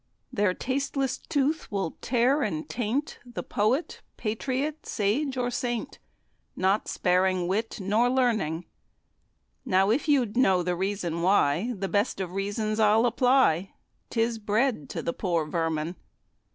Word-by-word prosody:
Their 200 -3 +1
tasteless 270 0 -1
tooth 300 0 -1
will 195 -5 -2
tear 250 +4 +2
and 310 +1 -2
taint 250 +5 -2
The 245 -2 -7
Poet, 230 +10 0 0.2
Patriot, 265 +7 -2
Sage 255 +7 0
or 245 -1 0
Saint, 240 -2 -3 0.6
Not 190 +3 +1
sparing 180 0 +1
wit 215 +5 -1
nor 210 +5 +2
learning. 215 -11 +1 1.0
Now, 190 +2 +3
if 275 +7 0
you'd 255 -8 +2
know 190 -8 +4
the 180 0 -1
reason 185 -3 -2
why, 185 +4 +2
The 195 +1 -2
best 205 +2 0
of 185 -2 -3
reasons 205 +3 -2
I'll 215 +1 +5
supply; 245 - +3 0.4
'Tis 230 -1 0
bread 215 - 0
to - - -4
the 170 - -1
poor 170 -4 0
vermin. 165 +1 -2
215 Hz, 135 wpm, -27 LUFS, 185-250 Hz, 1.0 s, I'll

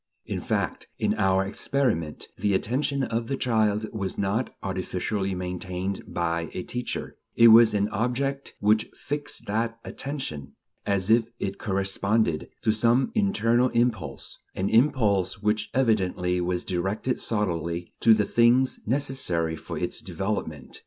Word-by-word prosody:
In - - -3
fact, - - -2
in - - +1
our 95 0 +3
experiment 100 - -1
the 100 -2 +1
attention 135 +6 0
of 115 -2 -2
the 135 - -1
little - - -8
child 110 -4 +1
was 100 -4 -3
not 100 +5 0
artificially 95 +1 -2
maintained 90 +1 -4
by 85 -1 -1
a 90 - -3
teacher; 125 +5 -5 0.2
it 115 0 +8
was 115 -1 +7
an 100 0 +2
object 125 +5 -2
which 105 +1 +2
fixed 145 +1 -3
that 115 +2 -1
attention, 80 - -5 0.3
as 100 0 +1
if 115 0 +5
it 95 -3 -4
corresponded 95 -3 0
to 110 - +3
some 120 - +2
internal 130 - +2
impulse; 110 - -1 0.2
an 95 - -1
impulse 110 -6 +2
which 105 +1 0
evidently 95 -7 +1
was 90 0 -1
directed 95 +7 -1
solely 85 -5 -2
to 115 -1 +6
the 105 -1 +1
things 120 +4 +3
"necessary" 115 - 0
for - - -7
its - - -2
development. 90 -8 -4
105 Hz, 140 wpm, -26 LUFS, 95-120 Hz, 0.3 s, it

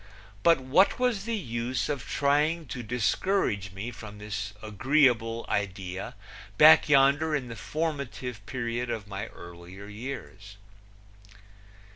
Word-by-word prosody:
But 165 -4 +5
what 135 +10 +3
was 250 -5 0
the 230 -1 -1
use 120 - -2
of 140 -6 -4
trying 150 +3 +1
to 125 - -5
discourage 110 - 0
me 100 +6 -6
from 110 -2 -10
this 105 0 -5
agreeable 115 0 +2
idea 95 -1 -3 0.4
back 80 - +8
yonder 145 +2 +4
in 125 -4 -3
the 115 - -6
formulative 125 -5 -4
period 120 -1 -3
of 110 -4 -3
my 100 0 -5
earlier 85 +3 -11
years? 105 -3 -8
120 Hz, 120 wpm, -28 LUFS, 105-140 Hz, 0.4 s, back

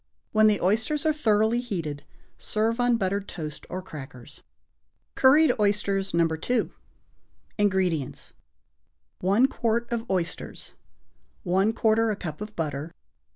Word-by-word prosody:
When 215 0 +5
the 210 -2 +3
oysters 220 - +1
are 310 - +3
thoroughly 220 -4 +2
heated, 165 -12 -4 0.4
serve 225 +2 -1
on 245 -1 +3
buttered 200 0 -1
toast 155 -4 -7
or 185 0 -5
crackers. 135 -8 -11 0.7
=Curried 295 +4 +5
Oysters, 200 -1 +1
No. 170 0 +3
2.= 165 +10 -1 0.9
INGREDIENTS. 185 -8 0 0.9
1 200 +7 +3
quart 235 -2 -1
of 235 0 -3
oysters. 180 -3 -3 0.7
1/4 220 +4 +2
a - - -1
cup 165 -3 -7
of 210 0 -7
butter. 150 -1 -3
205 Hz, 115 wpm, -26 LUFS, 170-230 Hz, 0.9 s, When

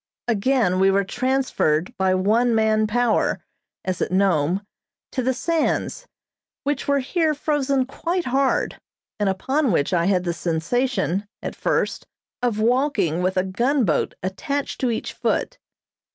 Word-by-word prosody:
Again 225 -4 +2
we 190 0 +5
were 200 +1 +3
transferred 240 - 0
by 190 -1 +2
one 225 +5 +2
man 220 -1 +3
power, 240 +1 +1 0.5
as 185 -1 -2
at - - -1
Nome, 185 -1 +2 0.5
to 260 - -1
the 255 +1 +1
sands, 330 - -1 0.6
which 285 -1 -2
were 280 0 +3
here 315 +3 +1
frozen 280 -3 0
quite 345 +6 -2
hard, 265 +1 0 0.4
and 205 -1 +2
upon 265 +8 0
which 165 +1 +1
I 170 -1 +2
had 185 -2 +2
the 175 -1 -1
sensation, 180 - -1 0.2
at - - -4
first, - - -1 0.3
of 240 -4 0
walking 225 - +1
with 185 +1 0
a 185 - +3
gunboat 230 - +1
attached 275 +10 -3
to 255 - +2
each 225 - -3
foot. - - -1
225 Hz, 140 wpm, -23 LUFS, 185-270 Hz, 0.6 s, we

